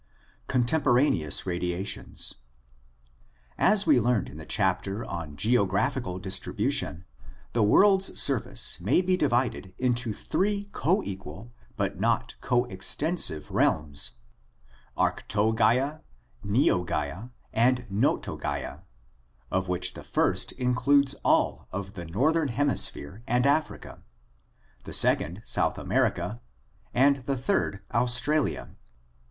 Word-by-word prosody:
Contemporaneous 125 Hz, -, +2 dB
Radiations. 90 Hz, +2 st, -3 dB, 0.6 s
— -, -, -35 dB
As 210 Hz, -1 st, +2 dB
we -, -, +5 dB
learned 120 Hz, -2 st, +1 dB
in 70 Hz, -, -11 dB
the 80 Hz, -, -10 dB
chapter 100 Hz, +4 st, 0 dB
on 80 Hz, -4 st, -6 dB
geographical 105 Hz, -, +1 dB
distribution, 90 Hz, -3 st, -2 dB, 0.5 s
the 120 Hz, -, +1 dB
world's 190 Hz, -, +4 dB
surface 130 Hz, -8 st, +1 dB
may 120 Hz, -, +2 dB
be 185 Hz, 0 st, +2 dB
divided 120 Hz, -, -1 dB
into 120 Hz, -2 st, 0 dB
three 200 Hz, -, -1 dB
coequal 115 Hz, -, -2 dB, 0.3 s
but -, -, -2 dB
not -, -, 0 dB
coextensive 120 Hz, -, 0 dB
realms: 70 Hz, -4 st, +1 dB, 0.8 s
Arctogaea, 115 Hz, +7 st, +1 dB, 0.4 s
Neogaea, 90 Hz, -, 0 dB, 0.2 s
and 125 Hz, +2 st, +2 dB
Notogaea, 95 Hz, -6 st, -2 dB, 0.7 s
of 95 Hz, 0 st, 0 dB
which 90 Hz, 0 st, 0 dB
the -, -, -10 dB
first -, -, +1 dB
includes 135 Hz, +2 st, +2 dB
all -, -, +1 dB
of 100 Hz, +1 st, -5 dB
the 90 Hz, -3 st, -7 dB
northern 145 Hz, -, +1 dB
hemi 135 Hz, +3 st, 0 dB
sphere, 95 Hz, +10 st, -2 dB
and 125 Hz, +1 st, +2 dB
Africa; 150 Hz, +3 st, -1 dB, 0.8 s
the -, -, -9 dB
second, 90 Hz, +7 st, +2 dB
South -, -, 0 dB
America; 115 Hz, +3 st, -1 dB, 0.5 s
and 140 Hz, +3 st, +4 dB
the 135 Hz, +1 st, -3 dB
third, 125 Hz, -, -1 dB
Australia. 125 Hz, +5 st, 0 dB
115 Hz, 100 wpm, -27 LUFS, 90-135 Hz, 0.8 s, we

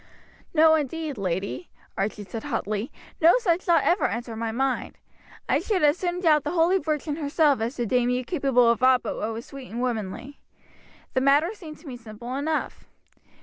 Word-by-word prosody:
"No, 320 Hz, 0 st, +6 dB
indeed, 310 Hz, 0 st, -1 dB
lady," 190 Hz, -, -3 dB, 0.3 s
Archie 205 Hz, +1 st, -2 dB
said 220 Hz, +4 st, -7 dB
hotly. 220 Hz, -4 st, -2 dB, 0.3 s
"No 335 Hz, +8 st, +7 dB
such 365 Hz, -8 st, +1 dB
thought 345 Hz, -3 st, +3 dB
ever 360 Hz, -, +2 dB
entered 230 Hz, -1 st, -5 dB
my 225 Hz, 0 st, -2 dB
mind. 260 Hz, +2 st, -2 dB, 0.5 s
I -, -, +2 dB
should 385 Hz, -7 st, -1 dB
as 295 Hz, 0 st, +5 dB
soon 355 Hz, -1 st, -2 dB
doubt 305 Hz, -5 st, +4 dB
the -, -, -2 dB
holy 355 Hz, +3 st, +3 dB
Virgin 305 Hz, -2 st, -2 dB
herself 290 Hz, -3 st, +2 dB
as 235 Hz, +4 st, -2 dB
to 240 Hz, -, -2 dB
deem 245 Hz, +2 st, +1 dB
you 250 Hz, +1 st, 0 dB
capable 270 Hz, -6 st, +2 dB
of 235 Hz, 0 st, +2 dB
aught 255 Hz, -1 st, +5 dB
but 220 Hz, -, -4 dB
what 220 Hz, -, -2 dB
was 225 Hz, +2 st, -6 dB
sweet 275 Hz, -2 st, -10 dB
and 235 Hz, -, -5 dB
womanly. 245 Hz, +3 st, -4 dB, 0.7 s
The 260 Hz, -, +1 dB
matter 285 Hz, +6 st, +4 dB
seemed 320 Hz, -8 st, -10 dB
to 325 Hz, -, -14 dB
me 250 Hz, -3 st, -6 dB
simple 235 Hz, +1 st, -8 dB
enough. 305 Hz, +3 st, -3 dB
270 Hz, 190 wpm, -25 LUFS, 235-315 Hz, 0.7 s, No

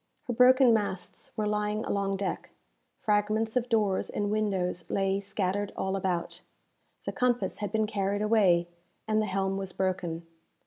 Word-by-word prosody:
Her 245 Hz, -, -3 dB
broken 255 Hz, +1 st, +6 dB
masts 200 Hz, -4 st, -2 dB
were 215 Hz, -, 0 dB
lying 210 Hz, +1 st, -1 dB
along 195 Hz, -1 st, -1 dB
deck 195 Hz, 0 st, -3 dB, 0.5 s
fragments 215 Hz, +1 st, +1 dB
of 250 Hz, -1 st, 0 dB
doors 210 Hz, -4 st, +1 dB
and 205 Hz, 0 st, -2 dB
windows 190 Hz, -5 st, -1 dB
lay 195 Hz, 0 st, +1 dB
scattered 200 Hz, 0 st, -2 dB
all 190 Hz, 0 st, -1 dB
about 180 Hz, -3 st, -2 dB, 0.6 s
the -, -, -2 dB
compass 250 Hz, -1 st, 0 dB
had 205 Hz, -2 st, -3 dB
been 220 Hz, 0 st, +1 dB
carried 205 Hz, -1 st, -1 dB
away, 195 Hz, -6 st, +4 dB, 0.4 s
and 215 Hz, 0 st, +2 dB
the 215 Hz, -, -1 dB
helm 195 Hz, 0 st, -1 dB
was 195 Hz, -2 st, -5 dB
broken. 175 Hz, -3 st, -2 dB
205 Hz, 150 wpm, -29 LUFS, 190-215 Hz, 0.6 s, broken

